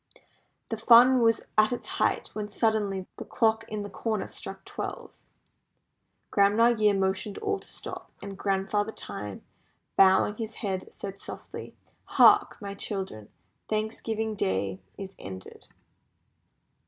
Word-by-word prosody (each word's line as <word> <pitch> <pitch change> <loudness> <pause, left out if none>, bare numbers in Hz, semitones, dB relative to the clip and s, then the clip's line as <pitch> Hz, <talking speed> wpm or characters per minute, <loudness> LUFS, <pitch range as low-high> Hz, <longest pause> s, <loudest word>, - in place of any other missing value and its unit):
The 225 - -2
fun 245 +3 +7
was 230 -1 +4 0.2
at 215 +2 +5
its 245 - -3
height - - +1
when 210 -1 -4
suddenly 205 -3 0
the - - -5
clock 225 0 +1
in 215 -2 -4
the 205 - -6
corner 215 0 -2
struck - - -7
twelve. - - -6 1.1
Grandma 210 +4 +5
Year 215 -3 +3
motioned 190 +1 -1
all 415 -2 -1
to - - -14
stop, - - -8
and 200 0 -7
Grandfather 200 +2 0
Time, 100 0 -7 0.5
bowing 195 +2 +5
his 225 -1 -5
head, 190 -4 -4
said 195 0 -7
softly, - - -8 0.3
"Hark! - - +5
my 200 -1 -6
children, 190 - -4 0.4
Thanksgiving 220 0 -2
Day 95 - -1 0.2
is 195 -1 -7
ended." 95 -1 -9
205 Hz, 130 wpm, -28 LUFS, 190-220 Hz, 1.1 s, fun